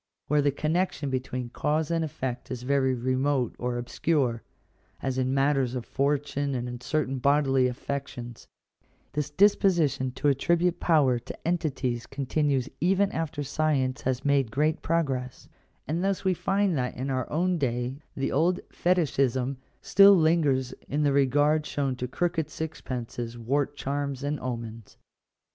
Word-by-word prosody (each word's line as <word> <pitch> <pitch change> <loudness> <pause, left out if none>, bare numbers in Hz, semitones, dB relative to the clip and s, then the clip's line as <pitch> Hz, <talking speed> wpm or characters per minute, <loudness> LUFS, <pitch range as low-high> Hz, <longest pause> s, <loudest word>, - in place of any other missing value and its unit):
Where 150 0 +2
the 145 - +3
connection 155 0 -1
between 125 -2 -3
cause 150 +3 0
and 165 -1 +1
effect 130 -5 -4
is 125 -1 -5
very 130 -1 +2
remote 130 0 0
or 125 0 -2
obscure, 120 -1 0 0.6
as 130 -1 -2
in 130 0 +1
matters 135 -2 +1
of 120 -2 -4
fortune 140 0 -1
and 125 0 -3
in 120 0 -6
certain 135 -2 -1
bodily 135 -1 +3
affec 140 +2 -4
tions, 120 -1 -9 0.7
this 150 0 -2
disposition 175 -6 +3
to 135 +3 -1
attribute 170 +5 +2
power 140 -7 +3
to 120 - -9
entities 135 -8 -1
continues 140 -1 0
even 195 +4 +2
after 155 -3 -3
science 135 -3 0
has 130 +1 -2
made 140 -4 +3
great 150 +7 0
progress; 135 -6 -2 0.4
and 165 +4 -1
thus 195 0 -1
we 190 - +3
find 195 0 +1
that 125 -2 -2
in 135 +2 -2
our 130 -2 -2
own 175 +3 +1
day 125 +1 -2
the 135 - -1
old 175 +6 +2
fetishism 135 -7 +1 0.3
still 200 0 +7
lingers 150 -6 +2 0.2
in 150 +2 0
the 145 -1 +3
regard 145 +3 +3
shown 140 -3 -2
to 125 - -3
crooked 165 +2 -1
sixpences, 120 -7 -5
wart 140 +5 -1
charms, 140 -1 -3
and 145 +1 -1
omens. 115 -3 -6
140 Hz, 150 wpm, -27 LUFS, 130-155 Hz, 0.7 s, still